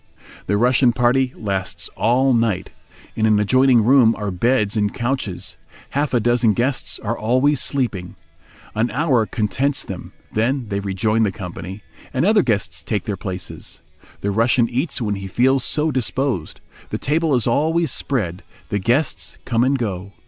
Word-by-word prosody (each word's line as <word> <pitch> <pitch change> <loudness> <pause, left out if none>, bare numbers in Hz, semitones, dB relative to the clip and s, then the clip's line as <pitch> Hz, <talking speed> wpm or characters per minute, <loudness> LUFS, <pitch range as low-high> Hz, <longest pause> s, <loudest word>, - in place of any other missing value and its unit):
The 100 - +2
Russian 125 +2 +4
party 125 +2 +2
lasts 95 -4 -3
all 130 +3 +2
night. 115 -5 0 0.4
In 110 0 +2
an 105 -1 +4
adjoining 130 +2 +4
room 120 -1 +5
are 105 -2 -3
beds 105 +2 +1
and 105 -1 +1
couches; 120 -6 -3 0.3
half 145 +1 0
a 125 - +3
dozen 120 -1 +3
guests 125 +5 -1
are 115 +2 -3
always 130 +6 +2
sleeping. 105 -10 0 0.6
An 115 +3 0
hour 125 -3 +1
contents 130 +6 -1
them, - - -7 0.2
then 120 +2 0
they 100 -1 -1
rejoin 100 +3 0
the 105 -3 +2
company, 90 +1 -8 0.3
and 130 - +2
other 210 +1 +5
guests 95 - -1
take 100 +4 -2
their 105 - -3
places. 90 -5 -7 0.4
The 100 - -1
Russian 115 +3 +3
eats 130 +1 -1
when 105 -2 0
he 95 -1 -5
feels 130 +6 +2
so 155 +1 0
disposed; 130 - -2 0.3
the - - -2
table 155 0 +1
is 120 - 0
always 160 +5 +1
spread, 100 -12 -2 0.3
the 105 - 0
guests 125 +10 0
come 115 -1 +1
and 135 +2 +2
go. 100 -5 -4
115 Hz, 160 wpm, -20 LUFS, 100-130 Hz, 0.6 s, room